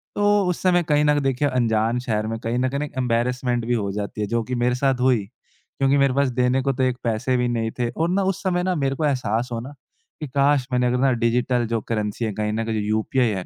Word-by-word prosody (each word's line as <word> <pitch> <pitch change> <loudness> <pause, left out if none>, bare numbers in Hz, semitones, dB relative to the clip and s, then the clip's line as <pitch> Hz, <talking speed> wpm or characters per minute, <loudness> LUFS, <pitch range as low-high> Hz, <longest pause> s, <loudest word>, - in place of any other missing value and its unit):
तो 205 0 +3
उस 175 - -2
समय 175 -1 +3
कहीं 150 0 +3
न 150 0 +3
देखिए 135 +1 +1
अंजान 115 -2 +1
शहर 110 -3 -2
में 115 0 -3
कहीं 115 +2 -2
न 130 0 +1
कहीं 140 +2 -3
एम्बैरेसमेंट 125 0 0
हो 100 -2 -2
जाती 105 +1 -4
है 105 - -1
जो 115 +1 0
कि 125 +2 -4
मेरे 125 +1 +1
साथ 130 0 +1
हुई। 125 -6 +2
क्योंकि 135 +4 -3
मेरे 140 -2 +3
पास 140 -1 +2
देने 125 +1 +2
को 135 +1 0
तो 130 - -1
एक 130 -1 +1
पैसे 115 +3 0
भी 125 - +1
नहीं 115 -2 -1
थे 120 - 0
और 165 +7 -1
ना 195 +2 +1
उस - - -8
समय 180 -1 0
ना 185 0 0
मेरे 135 -3 0
को 155 - -1
एहसास 125 -4 0
होना 120 +5 -5 0.5
कि 150 - -5
काश! 140 -1 +2
मैंने 125 0 +2
अगर 125 - +1
ना 135 +1 +3
डिजिटल 120 +1 +1
जो 115 -1 -1
करेंसी 110 +1 -2
है 110 - -2
कहीं 105 +1 -2
न 110 +1 -2
कहीं 115 - -2
जो 105 - 0
यूपीआई 110 +3 +1
है 95 -3 -3
125 Hz, 250 wpm, -22 LUFS, 115-135 Hz, 0.5 s, तो